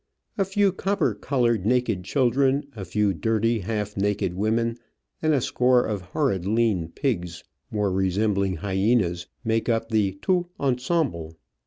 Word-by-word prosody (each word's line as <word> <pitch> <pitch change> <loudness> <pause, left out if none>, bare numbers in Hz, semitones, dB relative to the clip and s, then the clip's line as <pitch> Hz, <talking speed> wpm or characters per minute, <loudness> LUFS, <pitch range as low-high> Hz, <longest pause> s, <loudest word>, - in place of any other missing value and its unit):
A 195 - +1
few 195 +1 +2
copper 185 - 0
coloured, 120 -2 0
naked 115 -4 +1
children, 135 +5 +2
a 100 - -6
few 100 +2 +1
dirty, 110 +6 +1
half 105 +1 -3
naked 100 -2 0
women, 115 +4 0 0.4
and 155 - +2
a 140 -4 +2
score 125 +1 +3
of 105 -3 -2
horrid 95 - -1
lean 105 -4 +1
pigs, 90 - -3 0.3
more 105 -2 0
resembling 95 +1 +1
hyenas, 95 -1 0 0.2
make 115 0 0
up 115 -1 0
the 105 -4 +1
totU 180 -2 +1
ensemble. 125 - -1
110 Hz, 140 wpm, -25 LUFS, 95-125 Hz, 0.4 s, score